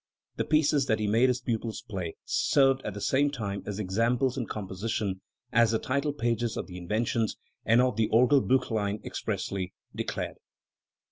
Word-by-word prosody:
The - - 0
pieces 150 -3 +3
that 110 - +2
he 105 - -1
made 115 +5 +4
his 125 0 0
pupils 115 -2 -3
play 95 -6 -4
served 135 -1 +3
at 105 -6 -5
the - - -5
same 140 +6 +2
time 100 -8 -4
as 100 -2 -3
examples 115 +6 +1
in 125 -5 -3
composition, 100 -1 -3 0.3
as 115 -1 +5
the 110 - +2
title 140 +5 -1
pages 120 -4 -1
of - - -3
the 90 -1 -8
Inventions 110 +4 -1 0.3
and 115 +3 +6
of 125 -4 +1
the 110 -1 +2
Orgelbilchlein 120 -4 +2
expressly 95 -2 -3 0.2
declared. - - -3
115 Hz, 160 wpm, -28 LUFS, 105-130 Hz, 0.3 s, and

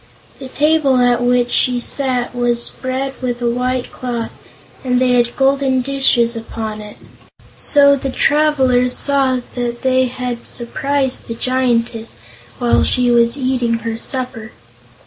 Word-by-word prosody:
The 265 - -8
table 295 -1 +2
at 245 -1 +2
which 245 0 +1
she 250 -1 +2
sat 250 -1 -2
was 240 -1 0
spread 260 +1 -4
with 245 -1 -3
a 240 - -1
white 250 +1 -2
cloth 240 -2 -5 0.5
and 250 -1 +1
had 245 -2 +2
golden 270 -1 +2
dishes 250 -3 +1
upon 220 -1 -6
it, 210 0 -11 0.6
so 280 -1 +5
the 270 0 -4
travelers 265 -4 +2
saw 270 -3 +1
that 240 -1 -4
they 260 0 +2
had 250 -1 -5
surprised 265 +2 -2
the 230 - -5
Giantess 235 - -1 0.4
while 240 -1 +2
she 250 -1 +2
was 235 +2 +3
eating 255 -3 0
her 225 0 -3
supper. 250 -4 -4
250 Hz, 135 wpm, -17 LUFS, 240-265 Hz, 0.6 s, so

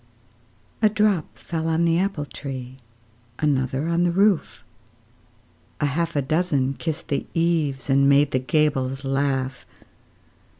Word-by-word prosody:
A 215 - +5
drop 210 -6 0
fell 165 -1 -4
on 165 +1 +2
the 165 0 +3
apple 190 -6 -1
tree, 130 -2 -8 0.6
Another 135 -1 0
on 170 +1 +1
the 175 - +3
roof; 195 0 +1 1.2
A - - +1
half 165 +3 -1
a 145 - +1
dozen 145 -3 +1
kissed 160 +3 -5
the 140 - -1
eaves, 165 -5 0
And 140 0 +4
made 140 0 +4
the 130 - +1
gables 135 0 0
laugh. 135 -1 -1
145 Hz, 130 wpm, -23 LUFS, 135-170 Hz, 1.2 s, A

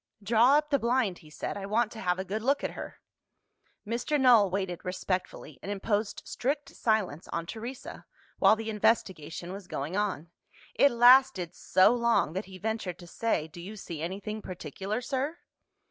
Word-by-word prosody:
"Draw 235 +6 +5
up 300 0 -1
the 280 - +3
blind," 235 -6 +1
he 155 - -16
said; 150 - -5
"I 195 -1 -5
want 220 +2 +1
to 225 - -9
have 180 -3 0
a 190 - -4
good 210 +3 -3
look 275 +5 +1
at - - -1
her." - - -8 0.9
Mr. 240 +7 -1
Null 240 -7 +6
waited 185 -2 -3
respectfully, 185 0 -4
and 200 - -5
imposed 205 +1 -1
strict 280 +2 -2
silence 210 - -1
on 170 0 -3
Teresa, 235 +7 -8 0.3
while - - +6
the 220 0 -4
investigation 190 -6 0
was 195 -2 -9
going 150 +4 -4
on. 190 -6 -2 0.4
It 280 - +5
lasted 240 -8 +5
so 185 +5 +4
long 235 -9 +2
that 190 +3 -3
he 190 -1 -11
ventured 210 -3 -3
to 175 - -12
say, 175 -3 -1
"Do 165 +2 -11
you 200 +5 -8
see 170 -6 -7
anything 200 +5 -4
particular, 190 - -5
sir?" 270 +6 -2
210 Hz, 175 wpm, -29 LUFS, 180-235 Hz, 0.9 s, Null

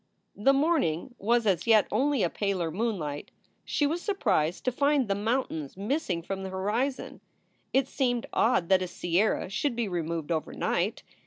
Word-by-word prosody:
The 215 +7 +4
morning 275 - +1
was 235 +3 +2
as 185 -3 +1
yet 220 -3 +6
only 270 +2 +2
a 175 - +2
paler 190 -5 -1
moonlight. 175 -8 -3 0.3
She 295 - 0
was 325 +4 -1
surprised 195 - 0
to 255 - +2
find 280 0 +2
the 200 - +1
mountains 200 - -2
missing 205 - -1
from 195 +2 -4
the 190 - -5
horizon. 210 +8 -2 0.5
It 270 0 +2
seemed 245 -4 0
odd 225 -7 +2
that 190 -1 +5
a 185 - -2
sierra 175 +4 0
should 240 +7 -1
be 235 -2 -1
removed 170 -3 -3
overnight. 160 -2 -1
210 Hz, 160 wpm, -28 LUFS, 175-260 Hz, 0.5 s, yet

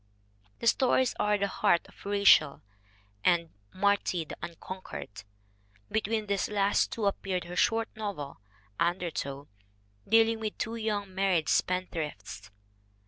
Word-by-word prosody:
The 235 - +3
others 260 0 +3
are 210 0 +2
The 200 - 0
Heart 175 -3 +2
of - - -14
Rachael 200 -8 +5 0.6
and 170 -2 +2 0.2
Martie, 190 -3 +1
the - - -8
Unconquered. 170 - -8 0.7
Be 220 - +2
tween 215 0 -1
these 200 -1 -1
last 205 -1 +2
two 220 - -2
appeared 190 -2 -1
her 175 +1 -8
short 225 +3 +2
novel, 195 - -5 0.4
Under 175 0 0
tow, 140 0 -5 0.6
dealing 225 +1 +4
with 215 -1 -4
two 225 +1 -3
young 210 -4 -2
married 190 -4 +1
spendthrifts. 155 - -2
195 Hz, 130 wpm, -29 LUFS, 170-215 Hz, 0.7 s, Rachael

